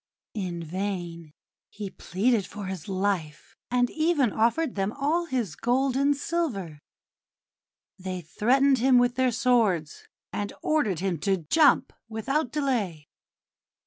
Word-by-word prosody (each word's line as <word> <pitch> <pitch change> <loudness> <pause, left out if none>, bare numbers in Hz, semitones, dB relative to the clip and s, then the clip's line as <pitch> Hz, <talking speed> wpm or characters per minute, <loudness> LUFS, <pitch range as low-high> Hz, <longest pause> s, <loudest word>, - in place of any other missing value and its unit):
In 180 -5 -4
vain 175 -2 -4 0.4
he 205 -2 -7
pleaded 210 +2 0
for 205 -1 -7
his 190 -4 -6
life, 185 -6 -2
and 245 0 +2
even 310 - +2
offered 235 +6 +1
them 195 0 -1
all 305 +5 0
his 240 - -2
gold 255 +2 +1
and 280 +1 +2
silver; 235 - -2 1.2
they 185 -1 -4
threatened 260 - +2
him 255 +1 +5
with 245 0 +3
their 255 0 +2
swords, 220 -10 +1 0.3
and 205 0 -3
ordered 215 - +1
him 185 -4 -1
to 195 +4 +1
jump 285 - +4 0.2
without 255 +5 -1
delay. 225 - -2
220 Hz, 125 wpm, -26 LUFS, 185-265 Hz, 1.2 s, him